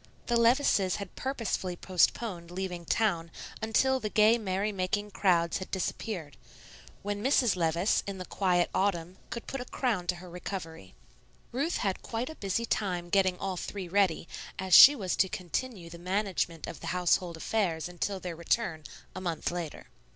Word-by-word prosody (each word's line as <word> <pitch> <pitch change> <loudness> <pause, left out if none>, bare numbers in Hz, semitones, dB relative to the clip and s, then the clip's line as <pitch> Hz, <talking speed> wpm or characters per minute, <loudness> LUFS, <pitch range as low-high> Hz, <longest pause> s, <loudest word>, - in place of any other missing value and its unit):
The 240 - 0
Levices 235 -5 +3
had 200 -3 -7
purposely 230 -8 -2
postponed 180 0 0
leaving 180 -1 -4
town 170 -5 +1 0.3
until 260 +4 +2
the 215 - -3
gay, 215 +3 +5
merry 200 0 -1
making 205 +2 -2
crowds 170 -4 +2
had 190 - -7
disappeared, 180 - -4 0.7
when 205 +1 -3
Mrs. 255 -4 +3
Levice, 170 +3 +2
in 200 -1 -4
the 185 - -6
quiet 180 -3 +1
autumn, 185 -2 0
could 235 - -6
put 270 - -4
a - - -6
crown 225 -10 -1
to 180 - +1
her 180 +1 -11
recovery. 170 - -7 0.6
Ruth 285 +8 0
had 195 -2 -1
quite 240 +6 -3
a - - -10
busy 205 +1 -1
time 180 -6 -1
getting 190 -1 +3
all 190 -1 -3
three 190 +1 -5
ready, 180 -3 +1 0.3
as 190 -1 -2
she 285 +10 +11
was 190 -8 -2
to 190 - +3
continue 185 +2 -4
the 170 0 -10
management 185 -3 -1
of - - -8
the - - -7
household 175 -1 +1
affairs 170 -3 -1
until 180 +3 -3
their 180 -2 -5
return, 170 0 -1 0.3
a - - -5
month 170 -4 -2
later. 175 -3 -5
190 Hz, 165 wpm, -30 LUFS, 175-215 Hz, 0.7 s, she